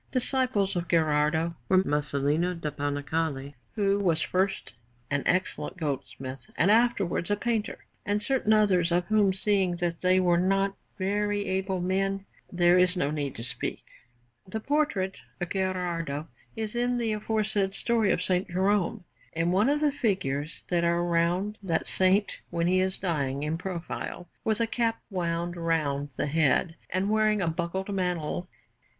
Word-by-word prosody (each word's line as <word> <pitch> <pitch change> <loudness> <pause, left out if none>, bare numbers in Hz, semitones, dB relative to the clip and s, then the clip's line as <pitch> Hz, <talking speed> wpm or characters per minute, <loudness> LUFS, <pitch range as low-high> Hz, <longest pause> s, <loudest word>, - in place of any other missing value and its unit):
Disciples 250 -6 +1
of 175 -1 -2
Gherardo 160 +1 +2 0.2
were 185 0 +5
Masolino 150 +3 0
da 150 -2 -3
Panicale, 145 0 -2 0.2
who 200 -1 +2
was 170 -5 +2
first 190 - -1 0.4
an 145 0 +1
excellent 185 +1 0
goldsmith 135 -1 -5
and 195 - +4
afterwards 215 -7 +2
a 205 - +3
painter, 225 0 -2 0.2
and 205 0 0
certain 235 0 +1
others, 190 -5 +4
of 175 +1 +2
whom, 210 -3 +4
seeing 190 -2 +1
that 170 -1 -2
they 185 0 +4
were 175 -2 +3
not 195 +2 +1 0.2
very 205 +1 0
able 190 0 -1
men, 195 +2 0 0.3
there 175 0 +4
is 180 +1 +3
no 145 -4 +1
need 145 -3 -3
to 115 - -6
speak. 125 - -3 0.6
The 220 +4 -4
portrait 230 -8 0 0.2
of 175 -1 -3
Gherardo 175 -6 -2 0.3
is 220 0 -4
in 245 +1 +1
the 230 -2 0
aforesaid 210 -2 0
story 230 -1 +2
of 180 - +1
S. 180 0 +1
Jerome, 190 0 +1 0.3
in 165 +1 +1
one 205 +7 +3
of 295 +1 +1
the 300 -1 +3
figures 165 - -1
that 175 -1 +1
are 170 0 +2
round 175 +4 0
that 170 -5 -1
Saint 190 +2 +2
when 170 -1 -1
he 185 +1 +3
is 185 0 +1
dying, 145 -6 -1
in 155 +2 -1
profile, 175 0 -5 0.2
with 220 0 0
a 230 - +3
cap 230 0 0
wound 175 -1 -2
round 155 -4 -1
the - - -1
head 160 +2 +2
and 190 +3 0
wearing 215 -1 +3
a 180 - 0
buckled 175 +4 -2
mantle. 180 -2 -2
185 Hz, 155 wpm, -28 LUFS, 165-205 Hz, 0.6 s, were